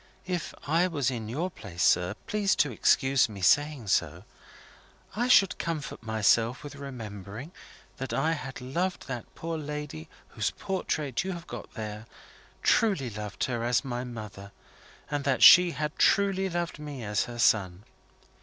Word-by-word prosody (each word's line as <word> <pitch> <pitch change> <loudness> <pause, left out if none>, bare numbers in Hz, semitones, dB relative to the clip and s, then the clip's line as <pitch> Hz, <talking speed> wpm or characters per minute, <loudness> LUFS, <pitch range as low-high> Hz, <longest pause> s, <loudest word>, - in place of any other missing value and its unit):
If 180 -3 -3
I 165 +5 +3
was 145 -7 0
in 115 -3 -5
your 165 +10 -2
place, 90 - -5
sir 90 +3 +3
please 205 -2 +1
to 145 - +2
excuse 135 +3 +3
my 100 -3 -9
saying 145 +5 +3
so - - 0 0.9
I 240 +3 0
should 195 -7 +5
comfort 160 -4 -4
myself 110 +2 +2
with 145 -1 -8
remembering 115 - -8 0.5
that 135 - -5
I 155 +4 +1
had 135 -5 -5
loved 175 +9 -2
that 125 -3 -5
poor 165 -1 -4
lady 150 - -6 0.2
whose - - -1
portrait 155 -8 -2
you 190 0 -3
have 170 -1 -8
got - - -9
there 105 0 -6 0.6
truly 190 - +2
loved 105 -1 -5
her 120 -3 -1
as 120 +4 +1
my 120 -1 -3
mother, 105 -5 -8 0.6
and 145 -1 -1
that 135 -2 +1
she 180 0 +10
had 150 -2 -3
truly 195 -1 +3
loved 175 -2 -3
me 145 -5 -7
as 105 -1 0
her 120 -1 -8
son. 100 -5 +2
135 Hz, 155 wpm, -28 LUFS, 110-165 Hz, 0.9 s, she